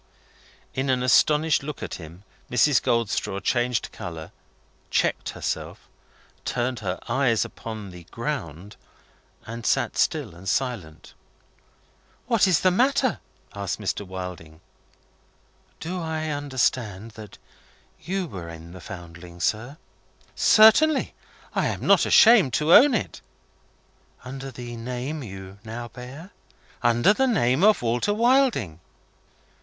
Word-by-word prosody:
In 135 Hz, +1 st, -2 dB
an 125 Hz, -1 st, +1 dB
astonished 150 Hz, +5 st, +3 dB
look 145 Hz, +1 st, -7 dB
at -, -, -5 dB
him, 85 Hz, +4 st, -12 dB, 0.3 s
Mrs. 125 Hz, 0 st, +3 dB
Goldstraw 115 Hz, -4 st, -1 dB
changed 120 Hz, +2 st, 0 dB
colour, 80 Hz, -2 st, -8 dB, 0.6 s
checked -, -, 0 dB
herself, -, -, -5 dB, 0.6 s
turned 125 Hz, -1 st, -2 dB
her 95 Hz, -3 st, -3 dB
eyes 120 Hz, -2 st, +2 dB
upon 110 Hz, -4 st, -8 dB
the 90 Hz, -1 st, -12 dB
ground, 105 Hz, -, -6 dB, 0.7 s
and 115 Hz, +1 st, -7 dB
sat -, -, 0 dB
still -, -, 0 dB
and 90 Hz, +3 st, -7 dB
silent. 105 Hz, -12 st, -3 dB, 1.1 s
"What 230 Hz, -5 st, +3 dB
is 180 Hz, -5 st, +3 dB
the 185 Hz, -, +4 dB
matter?" 260 Hz, +5 st, +2 dB, 0.3 s
asked 100 Hz, 0 st, -4 dB
Mr. 105 Hz, 0 st, -2 dB
Wilding. 90 Hz, -4 st, -8 dB, 1.2 s
"Do 180 Hz, +3 st, -4 dB
I 160 Hz, -1 st, -3 dB
understand 125 Hz, -7 st, -1 dB
that 110 Hz, -2 st, -12 dB, 0.6 s
you 190 Hz, +1 st, -2 dB
were 90 Hz, -, -8 dB
in 85 Hz, 0 st, -10 dB
the 90 Hz, -, -11 dB
Foundling, 85 Hz, -2 st, -10 dB
sir?" 110 Hz, -, -2 dB, 0.6 s
"Certainly. 265 Hz, +7 st, +5 dB, 0.4 s
I -, -, +1 dB
am -, -, -4 dB
not -, -, +5 dB
ashamed 215 Hz, -, +6 dB
to 155 Hz, +6 st, +3 dB
own 275 Hz, -1 st, +8 dB
it." 200 Hz, -, -4 dB, 1.0 s
"Under 135 Hz, +1 st, -7 dB
the 120 Hz, -1 st, -8 dB
name 125 Hz, +6 st, -5 dB
you 95 Hz, -3 st, -9 dB
now 120 Hz, +2 st, -7 dB
bear?" 135 Hz, -, -10 dB, 0.5 s
"Under 120 Hz, -, +4 dB
the 265 Hz, +4 st, +1 dB
name 135 Hz, -, +2 dB
of 210 Hz, -9 st, +4 dB
Walter 120 Hz, -, 0 dB
Wilding." 235 Hz, -, +2 dB
120 Hz, 120 wpm, -24 LUFS, 100-155 Hz, 1.2 s, own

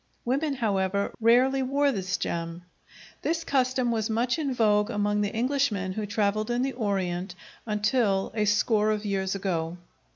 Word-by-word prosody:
Women, 275 Hz, +4 st, 0 dB
however, 200 Hz, -4 st, 0 dB
rarely 255 Hz, +4 st, +4 dB
wore 280 Hz, +2 st, +2 dB
this 190 Hz, -4 st, -2 dB
gem. 170 Hz, +1 st, -4 dB, 0.6 s
This 330 Hz, 0 st, -1 dB
custom 255 Hz, -3 st, +1 dB
was 220 Hz, -1 st, -1 dB
much 235 Hz, +6 st, 0 dB
in 285 Hz, -3 st, -1 dB
vogue 210 Hz, -3 st, +2 dB
among 205 Hz, -1 st, 0 dB
the 205 Hz, +1 st, -2 dB
Englishmen 230 Hz, -6 st, 0 dB
who 210 Hz, +1 st, -3 dB
travelled 210 Hz, +1 st, 0 dB
in 240 Hz, +1 st, +1 dB
the 270 Hz, 0 st, -1 dB
Orient, 190 Hz, -5 st, -2 dB, 0.3 s
until 210 Hz, -2 st, +1 dB
a 215 Hz, -1 st, 0 dB
score 210 Hz, +1 st, +2 dB
of 215 Hz, 0 st, -1 dB
years 195 Hz, -1 st, -1 dB
ago. 175 Hz, -3 st, -2 dB
215 Hz, 155 wpm, -27 LUFS, 195-250 Hz, 0.6 s, rarely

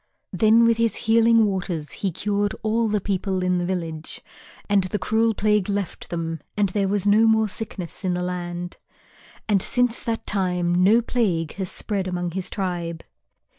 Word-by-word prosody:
Then 225 Hz, +1 st, +5 dB
with 230 Hz, -1 st, +3 dB
his 230 Hz, -1 st, +1 dB
Healing 230 Hz, 0 st, +4 dB
Waters 180 Hz, -6 st, -3 dB
he 195 Hz, -, -2 dB
cured 205 Hz, +4 st, -1 dB
all 225 Hz, +1 st, +1 dB
the 210 Hz, -1 st, +1 dB
people 190 Hz, -1 st, -1 dB
in 180 Hz, -1 st, +1 dB
the 175 Hz, -, -2 dB
village, 165 Hz, -4 st, -4 dB, 0.5 s
and 200 Hz, -2 st, +3 dB
the 185 Hz, -, -2 dB
cruel 220 Hz, +1 st, +1 dB
plague 210 Hz, -2 st, +1 dB
left 200 Hz, -3 st, -3 dB
them 165 Hz, -2 st, -3 dB, 0.2 s
and 205 Hz, -2 st, +2 dB
there 195 Hz, +1 st, 0 dB
was 200 Hz, 0 st, -1 dB
no 215 Hz, +2 st, +5 dB
more 220 Hz, -1 st, +3 dB
sickness 200 Hz, -3 st, -7 dB
in 180 Hz, -1 st, 0 dB
the 180 Hz, -, -2 dB
land. 175 Hz, -1 st, -4 dB, 0.7 s
And 205 Hz, -3 st, +3 dB
since 245 Hz, +1 st, 0 dB
that 225 Hz, -1 st, -2 dB
time 180 Hz, -3 st, 0 dB
no 225 Hz, +5 st, +5 dB
plague 185 Hz, -11 st, 0 dB
has 190 Hz, -2 st, -2 dB
spread 200 Hz, -3 st, -2 dB
among 175 Hz, -1 st, -2 dB
his 185 Hz, +1 st, -2 dB
tribe. 175 Hz, -4 st, -3 dB
195 Hz, 170 wpm, -23 LUFS, 180-220 Hz, 0.7 s, Then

